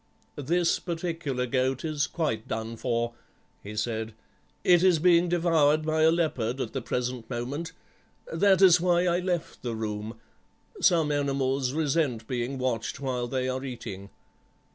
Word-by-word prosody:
"'This 165 Hz, +5 st, +1 dB
particular 165 Hz, -7 st, -3 dB
goat 130 Hz, +2 st, 0 dB
is 155 Hz, -2 st, 0 dB
quite 115 Hz, -10 st, -2 dB
done 110 Hz, +1 st, -4 dB
for,' 120 Hz, 0 st, -1 dB, 0.5 s
he 105 Hz, +1 st, -8 dB
said, 110 Hz, 0 st, -3 dB, 0.5 s
'it 175 Hz, -2 st, +5 dB
is 185 Hz, -2 st, +5 dB
being 175 Hz, +1 st, +4 dB
devoured 160 Hz, -3 st, +3 dB
by 155 Hz, 0 st, +1 dB
a 160 Hz, -, +6 dB
leopard 135 Hz, -8 st, 0 dB
at -, -, -3 dB
the 135 Hz, -, -2 dB
present 125 Hz, -1 st, -3 dB
moment. 135 Hz, +7 st, -4 dB, 0.6 s
That 195 Hz, -2 st, +4 dB
is 180 Hz, -2 st, +7 dB
why 175 Hz, 0 st, +3 dB
I 175 Hz, 0 st, +2 dB
left 180 Hz, -2 st, -3 dB
the 120 Hz, -2 st, -3 dB
room; 110 Hz, +1 st, -5 dB, 0.6 s
some 165 Hz, -5 st, +4 dB
animals 135 Hz, -2 st, 0 dB
resent 145 Hz, -6 st, 0 dB
being 125 Hz, +1 st, -2 dB
watched 125 Hz, -3 st, -2 dB
while 125 Hz, -3 st, -2 dB
they 130 Hz, 0 st, -1 dB
are 130 Hz, +1 st, -2 dB
eating. 100 Hz, -7 st, -7 dB
135 Hz, 145 wpm, -27 LUFS, 120-165 Hz, 0.6 s, is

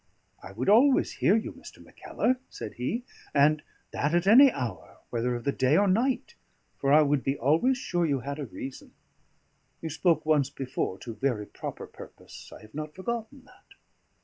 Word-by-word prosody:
"I 95 Hz, -, -10 dB
would 115 Hz, +6 st, -4 dB
always 255 Hz, +6 st, +5 dB
hear 195 Hz, -, +2 dB
you, 225 Hz, -, -2 dB
Mr. -, -, -13 dB
Mackellar," 255 Hz, -, -2 dB
said -, -, -8 dB
he, 210 Hz, -, -3 dB, 0.3 s
"and 150 Hz, +2 st, +4 dB, 0.3 s
that 150 Hz, +4 st, 0 dB
at 175 Hz, -, +2 dB
any 255 Hz, +7 st, +8 dB
hour, 125 Hz, -, -6 dB
whether 120 Hz, +1 st, -1 dB
of 120 Hz, -, -6 dB
the 140 Hz, -, +1 dB
day 135 Hz, +3 st, +2 dB
or 205 Hz, -, +4 dB
night, 240 Hz, +7 st, 0 dB, 0.5 s
for 140 Hz, -, +1 dB
I 155 Hz, +1 st, +7 dB
would 145 Hz, -2 st, +1 dB
be 135 Hz, +1 st, -1 dB
always 165 Hz, -, +2 dB
sure 175 Hz, -9 st, -1 dB
you 140 Hz, -3 st, 0 dB
had 140 Hz, +3 st, -5 dB
a 140 Hz, -, -4 dB
reason. 130 Hz, +4 st, -9 dB, 0.9 s
You 160 Hz, -, -5 dB
spoke 165 Hz, +1 st, +1 dB
once 150 Hz, -3 st, +2 dB
before 130 Hz, -8 st, -4 dB
to 115 Hz, -, -7 dB
very 120 Hz, -4 st, -1 dB
proper -, -, -7 dB
purpose; -, -, -13 dB
I -, -, -12 dB
have 110 Hz, 0 st, -16 dB
not 155 Hz, 0 st, -6 dB
forgotten 235 Hz, +6 st, -5 dB
that." 255 Hz, -, -21 dB
150 Hz, 180 wpm, -27 LUFS, 130-205 Hz, 0.9 s, any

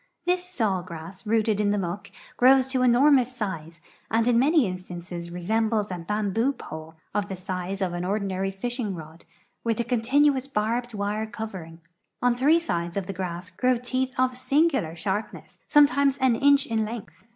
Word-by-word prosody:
This 360 Hz, 0 st, +1 dB
saw 220 Hz, -, -1 dB
grass, 175 Hz, +3 st, -9 dB
rooted 220 Hz, -1 st, +2 dB
in 210 Hz, -1 st, +2 dB
the 205 Hz, -, +1 dB
muck, 185 Hz, +1 st, -4 dB, 0.3 s
grows 260 Hz, +1 st, +6 dB
to 260 Hz, -1 st, 0 dB
enormous 255 Hz, 0 st, +4 dB
size, 170 Hz, -7 st, -5 dB, 0.3 s
and 225 Hz, +1 st, +2 dB
in 240 Hz, -1 st, +4 dB
many 295 Hz, +1 st, +4 dB
instances 180 Hz, -2 st, -6 dB
resembles 215 Hz, +4 st, 0 dB
a 180 Hz, -, -4 dB
bam 205 Hz, +3 st, -2 dB
boo 240 Hz, +6 st, +2 dB
pole, 160 Hz, -, -9 dB, 0.2 s
of 205 Hz, -1 st, 0 dB
the 195 Hz, -, -5 dB
size 185 Hz, +1 st, -4 dB
of 180 Hz, -2 st, -2 dB
an 175 Hz, 0 st, -3 dB
ordinary 195 Hz, 0 st, -1 dB
fishing 215 Hz, +1 st, -3 dB
rod, 160 Hz, 0 st, -11 dB, 0.4 s
with 230 Hz, -1 st, 0 dB
a -, -, +2 dB
continu 260 Hz, +5 st, +3 dB
ous 260 Hz, +1 st, -4 dB
barbed 235 Hz, 0 st, -1 dB
wire 210 Hz, +2 st, -2 dB
covering. 190 Hz, -8 st, -7 dB, 0.4 s
Oil' 245 Hz, -, +5 dB
tiiree 285 Hz, +7 st, +4 dB
sides 170 Hz, -, -3 dB
of 195 Hz, -, -1 dB
the 195 Hz, -, -5 dB
grass 180 Hz, 0 st, -5 dB
grow 250 Hz, +7 st, +2 dB
teeth 255 Hz, +1 st, -2 dB
of 255 Hz, 0 st, +2 dB
singular 270 Hz, -, +1 dB
sharpness, 190 Hz, +6 st, -4 dB
sometimes 280 Hz, -2 st, +4 dB
an 260 Hz, -3 st, +3 dB
inch 280 Hz, +3 st, +4 dB
in 225 Hz, -4 st, 0 dB
length. 215 Hz, -2 st, -8 dB
215 Hz, 175 wpm, -26 LUFS, 185-255 Hz, 0.4 s, grows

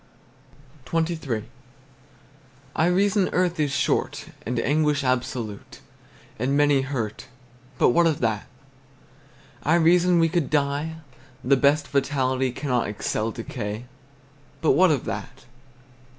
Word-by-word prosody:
XXIII. 160 Hz, -9 st, -1 dB, 1.3 s
I 160 Hz, +1 st, +3 dB
reason, 195 Hz, +2 st, +2 dB
earth 180 Hz, -2 st, +1 dB
is 145 Hz, -2 st, +1 dB
short, -, -, -1 dB, 0.2 s
And 125 Hz, 0 st, -1 dB
anguish 145 Hz, +2 st, +1 dB
absolute, 125 Hz, -5 st, -3 dB, 0.6 s
And 135 Hz, +4 st, +1 dB
many 145 Hz, -2 st, +4 dB
hurt; 130 Hz, -3 st, -4 dB, 0.5 s
But -, -, +4 dB
what 170 Hz, +7 st, +4 dB
of 155 Hz, -3 st, 0 dB
that? 110 Hz, -3 st, -1 dB, 1.1 s
I 155 Hz, +4 st, +2 dB
reason, 175 Hz, +1 st, +4 dB
we 165 Hz, -1 st, +4 dB
could 165 Hz, -3 st, -1 dB
die: 145 Hz, +2 st, 0 dB, 0.5 s
The 140 Hz, +3 st, +4 dB
best 140 Hz, +3 st, +2 dB
vitality 130 Hz, -2 st, 0 dB
Cannot 125 Hz, -2 st, -1 dB
excel 105 Hz, +1 st, -2 dB
decay; 115 Hz, -1 st, -5 dB, 0.7 s
But 160 Hz, -, +3 dB
what 185 Hz, 0 st, +5 dB
of 145 Hz, -5 st, 0 dB
that? 110 Hz, +3 st, -6 dB
140 Hz, 115 wpm, -24 LUFS, 125-160 Hz, 1.3 s, what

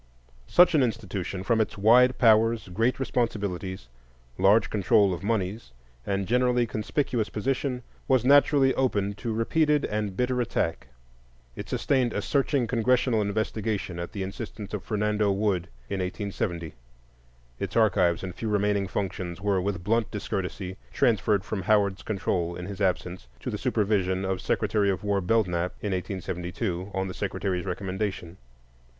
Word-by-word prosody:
Such 180 Hz, -, +6 dB
an 155 Hz, -, +4 dB
institution, 100 Hz, -6 st, -2 dB
from 110 Hz, +3 st, +2 dB
its 110 Hz, -, -2 dB
wide 125 Hz, +5 st, +5 dB
powers, 115 Hz, -2 st, +4 dB
great 115 Hz, +9 st, 0 dB
responsibilities, 100 Hz, -, -2 dB, 0.5 s
large 100 Hz, +4 st, +4 dB
control 100 Hz, -1 st, +3 dB
of 85 Hz, -, -5 dB
moneys, 100 Hz, -, -2 dB, 0.3 s
and 100 Hz, -1 st, -1 dB
generally 125 Hz, 0 st, +2 dB
conspicuous 115 Hz, +1 st, -1 dB
position, 125 Hz, +2 st, -2 dB, 0.2 s
was 130 Hz, -3 st, +3 dB
naturally 140 Hz, -1 st, +5 dB
open 100 Hz, -6 st, 0 dB
to 120 Hz, -, -2 dB
repeated 150 Hz, +7 st, +2 dB
and 105 Hz, -3 st, -3 dB
bitter 125 Hz, 0 st, +1 dB
attack. 105 Hz, -8 st, -2 dB, 0.7 s
It -, -, -7 dB
sustained 130 Hz, -4 st, +1 dB
a 105 Hz, -, -1 dB
searching 140 Hz, -2 st, +1 dB
Congressional 120 Hz, 0 st, +2 dB
investigation 105 Hz, -3 st, -2 dB
at 85 Hz, -, -5 dB
the 100 Hz, -, -4 dB
instance 105 Hz, +1 st, -7 dB
of 105 Hz, -, -3 dB
Fernando 105 Hz, -1 st, 0 dB
Wood 95 Hz, -3 st, 0 dB, 0.2 s
in 100 Hz, -, -3 dB
1870. 90 Hz, -3 st, -3 dB, 0.9 s
Its -, -, -4 dB
archives 90 Hz, -6 st, +3 dB
and 90 Hz, -1 st, -5 dB
few 110 Hz, -, -4 dB
remaining 105 Hz, -1 st, +1 dB
functions 90 Hz, -3 st, -4 dB
were 100 Hz, -1 st, +1 dB
with 95 Hz, -2 st, -3 dB
blunt 110 Hz, +3 st, +1 dB
discourtesy 95 Hz, -2 st, -4 dB
transferred 105 Hz, -, +2 dB
from 105 Hz, -3 st, -3 dB
Howard's 100 Hz, -1 st, +2 dB
control, 90 Hz, -4 st, -2 dB
in 90 Hz, -, -6 dB
his 100 Hz, +1 st, -7 dB
absence, 90 Hz, -3 st, -1 dB
to -, -, -4 dB
the -, -, -3 dB
supervision 95 Hz, -3 st, 0 dB
of 95 Hz, -1 st, -2 dB
Secretary 105 Hz, -1 st, +1 dB
of 95 Hz, 0 st, -1 dB
War 100 Hz, -1 st, +1 dB
Belknap 90 Hz, -3 st, +1 dB
in 105 Hz, -, -3 dB
1872, 90 Hz, 0 st, -3 dB
on 95 Hz, 0 st, -2 dB
the 90 Hz, -, -5 dB
Secretary's 95 Hz, -2 st, -2 dB
recommendation. 95 Hz, -1 st, -4 dB
105 Hz, 145 wpm, -27 LUFS, 95-115 Hz, 0.9 s, Such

